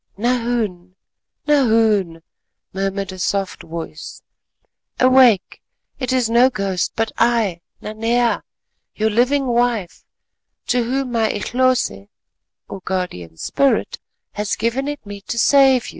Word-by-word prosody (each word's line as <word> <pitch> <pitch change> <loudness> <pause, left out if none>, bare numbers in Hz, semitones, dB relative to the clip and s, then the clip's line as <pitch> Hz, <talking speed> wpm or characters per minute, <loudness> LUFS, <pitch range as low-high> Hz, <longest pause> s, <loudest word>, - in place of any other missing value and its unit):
"Nahoon! 230 -6 -1 0.5
Nahoon!" 220 - +2 0.5
murmured 195 0 -2
a 185 - -9
soft 195 +1 -2
voice, 160 -1 -8 0.8
"awake, 255 -6 +4 0.4
it 255 -2 -2
is 255 -3 +2
no 240 +3 +4
ghost, 195 -6 -2
but 225 0 -1
I—Nanea—I, 230 +2 0 0.5
your 220 +1 0
living 260 +5 +2
wife, 240 -6 -1 0.7
to 245 -1 +2
whom 260 +1 -2
my 225 -2 +1
_Ehlose_[*] 235 - 0 2.2
has 210 0 -2
given 235 +5 -1
it 290 -5 -5
me 200 0 -8
to 235 - -5
save 265 0 +4
you." - - -7
230 Hz, 100 wpm, -19 LUFS, 195-250 Hz, 2.2 s, awake